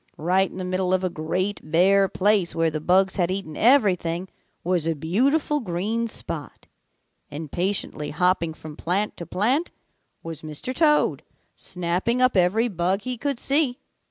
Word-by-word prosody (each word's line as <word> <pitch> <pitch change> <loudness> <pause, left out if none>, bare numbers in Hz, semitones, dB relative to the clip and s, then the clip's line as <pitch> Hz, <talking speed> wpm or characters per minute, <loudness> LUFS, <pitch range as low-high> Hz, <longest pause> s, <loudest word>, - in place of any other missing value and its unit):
Right 185 +4 +2
in - - -11
the 185 - -4
middle 185 0 0
of 185 - -2
a 185 - -1
great 180 +6 -2
bare 190 +5 +3
place 195 -2 +1
where 165 -1 +1
the 155 - -3
bugs 190 +3 +2
had 175 -2 +1
eaten 185 -5 -3
everything 190 -8 +2 0.3
was 175 -2 0
a 165 - 0
beautiful 265 - +1
green 220 +2 -2
spot, 150 - -6 0.6
and 150 0 -7
patiently 175 -5 -2
hopping 170 0 +1
from 155 -1 -10
plant 190 +6 -1
to 170 - -7
plant 250 - 0 0.5
was 165 -2 -7
Mr. 155 - -6
Toad, 300 +1 +2 0.3
snapping 180 +7 -2
up 255 -2 +3
every 195 +6 +3
bug 185 -1 -1
he 255 +1 -2
could 280 +2 -2
see. 275 -1 +2
185 Hz, 155 wpm, -24 LUFS, 170-220 Hz, 0.6 s, bare